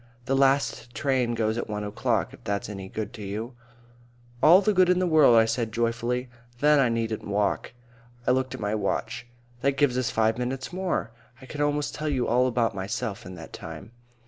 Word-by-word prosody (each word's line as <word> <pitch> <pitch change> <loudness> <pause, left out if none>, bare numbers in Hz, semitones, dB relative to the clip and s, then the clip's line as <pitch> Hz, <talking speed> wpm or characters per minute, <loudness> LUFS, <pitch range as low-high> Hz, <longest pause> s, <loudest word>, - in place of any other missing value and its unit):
"The 135 - +1
last 135 -2 +1
train 130 -4 0
goes 110 0 0
at - - -5
one 105 0 -3
o'clock, 105 0 -1
if - - -15
that's 100 0 -2
any 95 -2 -7
good 110 +2 -5
to 115 - -9
you." 105 +5 -5 0.9
"All 170 +4 +8
the 210 +1 +1
good 185 -1 +4
in 180 - +4
the 185 - +2
world," 155 -8 +6
I 115 0 +6
said 115 0 -1
joyfully. 120 +2 -1 0.3
"Then 150 +1 +5
I 130 -3 +4
needn't 115 -1 -2
walk." 100 +2 -1 0.5
I - - +3
looked 130 0 0
at - - -9
my 105 0 -2
watch. 115 +2 -2 0.3
"That 140 0 +1
gives 135 -3 +2
us 125 -2 0
five 110 0 +1
minutes 130 +5 -3
more. 180 -10 -2 0.3
I 130 - -12
could 145 +2 -6
almost 145 0 0
tell 155 0 -3
you 130 -4 0
all 125 +2 +3
about 120 -3 +1
myself 100 0 -4
in 90 - -8
that 80 -2 -11
time." 80 +6 -9
120 Hz, 200 wpm, -26 LUFS, 110-135 Hz, 0.9 s, All